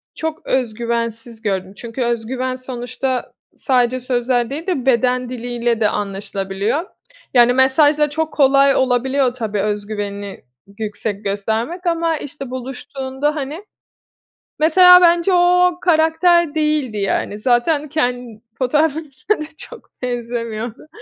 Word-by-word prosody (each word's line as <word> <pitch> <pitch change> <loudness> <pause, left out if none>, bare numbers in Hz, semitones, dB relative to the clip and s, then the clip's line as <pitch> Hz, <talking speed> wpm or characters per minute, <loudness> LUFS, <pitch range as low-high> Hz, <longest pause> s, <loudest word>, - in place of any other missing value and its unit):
çok 320 0 -4
öz 250 -4 0
güvensiz 230 0 -4
gördüm. 190 -3 -2
Çünkü 235 +3 -6
öz 235 -1 -1
güven 255 +1 -3
sonuçta 255 0 -4 0.2
sadece 255 -1 +1
sözler 245 -1 0
değil 305 +6 -6
de 285 -9 -1
beden 250 -1 +2
diliyle 240 -1 -2
de 215 -2 +3
anlaşılabiliyor. 200 - -3 0.5
Yani, 245 -1 +6
mesajda 290 +3 +4
çok 315 +1 -2
kolay 275 -1 +4
olabiliyor 260 +1 +1
tabii 215 -5 -2
öz 210 0 -2
güvenini 205 -1 -5 0.3
yüksek 210 -1 -4
göstermek 220 - -2
ama, 335 -1 +1
işte, 280 -2 -8
buluştuğunda 265 +2 -4
hani 300 +7 -5 1.0
Mesela, 360 +3 +8
bence 345 +1 +4
o, - - +4 0.4
o 350 - -16
karakter 330 -1 +3
değildi, 300 -7 0
yani. 200 +1 -1
Zaten 260 +6 +1
ken 245 -6 -2 0.2
fotoğraflarına 295 +5 0
da - - -5
çok - - -12
benzemiyordu. 235 -1 -4
255 Hz, 125 wpm, -19 LUFS, 230-300 Hz, 1.0 s, Mesela